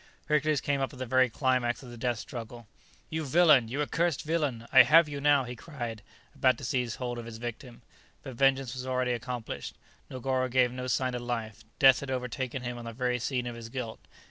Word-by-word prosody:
Hercules 150 0 +1
came 140 -1 0
up 135 - -1
at - - -11
the 130 - -4
very 130 +1 +3
climax 125 0 0
of 125 - -10
the - - -9
death 120 0 -1
struggle. 120 0 -8 0.4
"You 160 0 -2
villain! 150 -4 +5
you 140 +6 -1
accursed 165 +1 0
villain! 150 -8 -1
I - - +11
have 165 +1 +6
you 145 -1 -5
now!" 145 -1 +4
he 125 0 -7
cried, 120 -5 -6 0.3
about 130 -1 +3
to - - -11
seize 125 -2 -1
hold 120 -2 -4
of 115 - -8
his 115 -1 -8
victim. 120 +1 -8 0.4
But 130 - -7
vengeance 135 0 +2
was 130 0 -6
already 130 -1 0
accomplished. 120 -1 -5 0.3
Negoro 130 0 -1
gave 125 0 +3
no 125 0 -5
sign 130 0 0
of 125 - -3
life; 115 -3 -4
death 135 -2 +7
had 140 - -7
overtaken 130 0 -3
him 120 0 -4
on 120 - -9
the 115 - -6
very 125 +1 -1
scene 125 0 -2
of 120 - -4
his 115 -1 -8
guilt. 120 -2 -5
125 Hz, 215 wpm, -29 LUFS, 120-135 Hz, 0.4 s, I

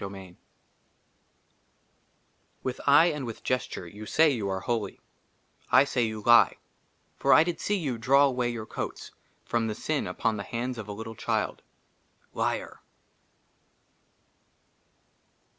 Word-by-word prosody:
62 100 0 -6
I - - -8
Lvn 90 -2 -13 2.3
with 130 -1 -4
eye 145 +3 +7
and 150 -3 -5
with 115 -3 -7
gesture 125 -7 -2
you 105 +5 -10
say 160 +5 +4
you 110 -7 -2
are 95 0 -2
holy, 115 -3 -3 0.7
i - - +7
say 140 -3 -1
you 110 -1 -5
lie; 120 0 +6 0.6
for - - +2
i 155 - +7
did 170 0 -3
see 205 - 0
you 135 -10 -3
draw 135 +5 +5
away 125 -3 0
your 115 -2 -5
coats - - -6 0.3
from 115 -1 0
the 110 - -3
sin 155 +4 -2
upon 110 -1 -1
the - - -4
hands 120 +3 -4
of 110 - -7
a - - -6
little 110 +2 -7
child, - - -2 0.7
liar! - - -2
120 Hz, 140 wpm, -27 LUFS, 110-135 Hz, 2.3 s, eye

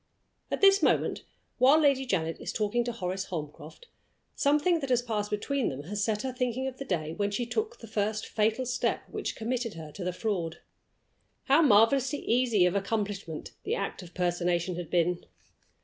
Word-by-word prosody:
At - - -2
this 395 0 +7
moment, - - +1 0.3
while 270 +5 +6
Lady 275 -3 +3
Janet 165 -7 -1
is - - -4
talking 220 +3 0
to 240 - -1
Horace 190 -3 -3
Holmcroft, 155 - -7 0.5
something 300 +4 +2
that 275 -3 -4
has 245 -1 +2
passed 210 -3 -2
between 260 +5 -1
them 135 +2 -6
has 205 +6 -3
set 210 -1 0
her 260 -1 -3
thinking 250 0 -1
of 260 -1 -6
the 275 - -5
day 160 - -2
when 205 +4 -1
she 220 +4 -2
took 440 - -2
the 230 - -11
first 215 0 -1
fatal 220 +4 0
step 250 0 -1
which - - -4
committed 235 -1 -2
her 160 -2 -8
to 185 - -7
the 180 - -1
fraud. 180 -5 -2 0.9
How 280 +4 +5
marvelously 270 +2 +4
easy 235 -6 +3
of 180 - +2
accomplishment 200 -5 -3
the - - -1
act 195 - -3
of 175 -1 -13
personation 175 0 0
had 175 -2 -6
been! 175 0 +1
215 Hz, 180 wpm, -29 LUFS, 180-255 Hz, 0.9 s, this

